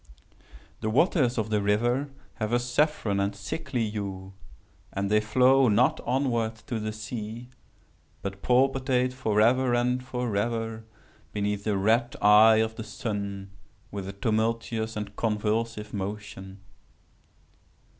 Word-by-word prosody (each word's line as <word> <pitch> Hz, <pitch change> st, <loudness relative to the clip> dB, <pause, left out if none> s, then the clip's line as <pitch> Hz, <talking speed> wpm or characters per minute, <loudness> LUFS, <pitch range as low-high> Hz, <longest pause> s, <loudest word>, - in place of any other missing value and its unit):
"The 110 Hz, -, -2 dB
waters 130 Hz, -, +2 dB
of 110 Hz, -1 st, -1 dB
the 105 Hz, -1 st, +2 dB
river 120 Hz, +7 st, +1 dB, 0.3 s
have 110 Hz, 0 st, -2 dB
a -, -, +5 dB
saffron 120 Hz, -4 st, 0 dB
and 100 Hz, +1 st, 0 dB
sickly 120 Hz, +3 st, -3 dB
hue; 95 Hz, -2 st, -5 dB, 0.6 s
and 100 Hz, +1 st, -2 dB
they 105 Hz, -, +5 dB
flow 130 Hz, +5 st, +4 dB
not 115 Hz, +4 st, +3 dB
onwards 120 Hz, -3 st, 0 dB
to 120 Hz, -3 st, -3 dB
the 110 Hz, 0 st, -3 dB
sea, 110 Hz, +2 st, -6 dB, 0.7 s
but 100 Hz, 0 st, -5 dB
palpitate 130 Hz, 0 st, +2 dB
forever 120 Hz, +1 st, +2 dB
and 125 Hz, +1 st, +1 dB
forever 115 Hz, -2 st, -2 dB, 0.5 s
beneath 105 Hz, 0 st, -2 dB
the 105 Hz, -2 st, +1 dB
red 115 Hz, +5 st, +2 dB
eye 105 Hz, +2 st, +7 dB
of 110 Hz, 0 st, 0 dB
the 110 Hz, -, -4 dB
sun 100 Hz, -4 st, -5 dB, 0.4 s
with 100 Hz, -2 st, -5 dB
a -, -, -6 dB
tumultuous 110 Hz, +1 st, -1 dB
and 105 Hz, -1 st, -5 dB
convulsive 105 Hz, 0 st, -1 dB
motion. 100 Hz, -1 st, -6 dB
110 Hz, 125 wpm, -27 LUFS, 105-125 Hz, 0.7 s, eye